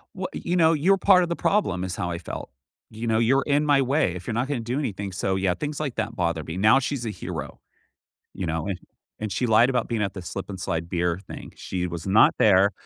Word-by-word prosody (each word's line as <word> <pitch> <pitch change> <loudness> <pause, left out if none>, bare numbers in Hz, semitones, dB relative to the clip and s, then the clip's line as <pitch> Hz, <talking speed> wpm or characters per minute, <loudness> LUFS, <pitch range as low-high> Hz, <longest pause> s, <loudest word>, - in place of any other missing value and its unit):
W 185 0 -3
you 175 - -2
know, 165 -2 +5
"You're 180 +6 +3
part 185 -2 +5
of 175 - -3
the 170 - -1
problem," 100 - 0
is 95 -1 -3
how 90 -3 -3
I 85 - -3
felt. 85 - -7 0.4
You 110 +2 -6
know, 110 -1 +2
"You're 135 +4 +3
in 145 +1 +2
my 145 -2 +4
way. 135 - +1
If 90 0 -8
you're 115 - -2
not 120 +4 0
gonna 140 -3 -2
do 120 +3 -3
anything," 100 -8 -3
so 95 +1 -1
yeah, 95 -1 +1
things 145 - -4
like 145 -5 -3
that 110 +1 -3
bother 85 -4 -1
me, 80 +3 -6
now 110 +7 +5
she's 130 -2 -3
a - - -2
hero, 90 -6 -6 0.8
you 95 - -4
know, 80 0 -2
an 100 -2 -2 0.4
and 105 -2 -3
she 125 - 0
lied 115 +3 +5
about 125 -3 0
being 115 -3 -1
at 100 - -1
the 95 - -7
slip 95 +3 -6
and 95 -1 -7
slide 85 -1 -2
beer 85 -1 0
thing, - - -9
she 90 -1 -3
was 85 0 -6
not 95 +3 +5
there. 100 -1 +5
110 Hz, 250 wpm, -25 LUFS, 90-135 Hz, 0.8 s, know